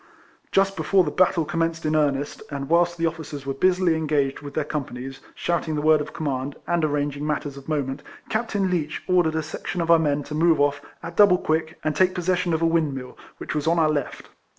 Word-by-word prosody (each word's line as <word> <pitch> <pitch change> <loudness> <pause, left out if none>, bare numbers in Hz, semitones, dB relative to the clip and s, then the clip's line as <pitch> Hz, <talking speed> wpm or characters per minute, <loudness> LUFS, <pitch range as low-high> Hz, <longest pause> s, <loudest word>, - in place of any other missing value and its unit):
Just 195 0 +2
before 185 +3 +3
the 150 - -2
battle 175 -2 +2
commenced 165 0 -1
in 155 - +1
54 155 -1 +4
RECOLLECTIONS 140 0 -2
OF - - -16
earnest, - - -21
and 140 -1 -4
whilst 170 0 +3
the 165 - 0
officers 155 -4 -4
were 135 - -2
busily 180 +3 +2
engaged 150 -4 0
with 145 -1 -9
their 155 - +1
companies, 135 -3 -5 0.2
shouting 170 -2 -1
the 150 - -1
word 155 -1 +5
of - - -6
command, 140 -2 -3
and 175 -1 0
arranging 145 -1 -1
matters 145 -2 -2
of 140 +2 -11
moment, 140 -2 -2 0.3
Captain 215 -4 -1
Leech 155 -4 -2
ordered 175 -3 +2
a 160 - 0
section 155 +4 -5
of 170 0 +1
our 165 - +7
men 145 -2 0
to 150 - -8
move 165 +1 +3
off, 145 0 +2 0.2
at 170 0 -7
double 200 -3 +7
quick, 160 0 -1
and 155 -1 0
take 185 0 +3
possession 180 0 0
of 160 0 0
a - - +4
windmill, 145 -6 -1 0.2
which - - -5
was 150 0 -2
on 170 +1 +3
our 155 -2 +3
left. 145 -3 -4
155 Hz, 225 wpm, -24 LUFS, 145-170 Hz, 0.3 s, our